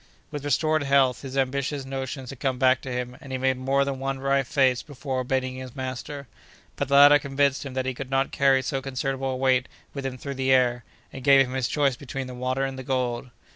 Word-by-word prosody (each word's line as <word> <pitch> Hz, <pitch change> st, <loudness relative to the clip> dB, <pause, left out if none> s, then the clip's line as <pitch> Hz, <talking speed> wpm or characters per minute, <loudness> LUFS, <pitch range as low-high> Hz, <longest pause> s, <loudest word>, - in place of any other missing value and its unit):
With 145 Hz, -1 st, -5 dB
restored 155 Hz, +2 st, +1 dB
health, 135 Hz, -3 st, +3 dB
his 135 Hz, -1 st, -6 dB
ambitious 135 Hz, +1 st, -1 dB
notions 135 Hz, -1 st, -5 dB
had 135 Hz, -, -11 dB
come 130 Hz, -2 st, -1 dB
back 130 Hz, 0 st, +3 dB
to 130 Hz, -, -6 dB
him, 125 Hz, 0 st, -4 dB
and 135 Hz, -, -10 dB
he 130 Hz, -, -1 dB
made 130 Hz, 0 st, +1 dB
more 135 Hz, +1 st, +1 dB
than 135 Hz, -1 st, -3 dB
one 135 Hz, 0 st, -2 dB
wry 135 Hz, +1 st, +1 dB
face 130 Hz, -1 st, +2 dB
before 135 Hz, -2 st, -5 dB
obeying 130 Hz, 0 st, -1 dB
his 130 Hz, -1 st, -8 dB
master; 130 Hz, +2 st, -6 dB, 0.5 s
but 140 Hz, -, -2 dB
the 140 Hz, -, +2 dB
latter 145 Hz, +1 st, +8 dB
convinced 140 Hz, 0 st, 0 dB
him 130 Hz, -, -9 dB
that 130 Hz, -1 st, -1 dB
he 130 Hz, -, -1 dB
could 130 Hz, +1 st, -7 dB
not 135 Hz, 0 st, +1 dB
carry 135 Hz, -1 st, +3 dB
so 135 Hz, 0 st, -2 dB
considerable 135 Hz, 0 st, -2 dB
a 130 Hz, -, -2 dB
weight 130 Hz, -1 st, +2 dB, 0.3 s
with 140 Hz, -, -5 dB
him 130 Hz, -1 st, -4 dB
through 140 Hz, +2 st, -5 dB
the 130 Hz, 0 st, 0 dB
air, 125 Hz, -2 st, +3 dB, 0.3 s
and 130 Hz, -, -8 dB
gave 135 Hz, 0 st, +6 dB
him 125 Hz, -, -7 dB
his 130 Hz, -3 st, 0 dB
choice 140 Hz, -3 st, +1 dB
between 135 Hz, +1 st, -6 dB
the 125 Hz, -, -8 dB
water 130 Hz, +2 st, -1 dB
and 135 Hz, -1 st, -5 dB
the -, -, -6 dB
gold. 125 Hz, -1 st, -2 dB
135 Hz, 235 wpm, -25 LUFS, 130-140 Hz, 0.5 s, latter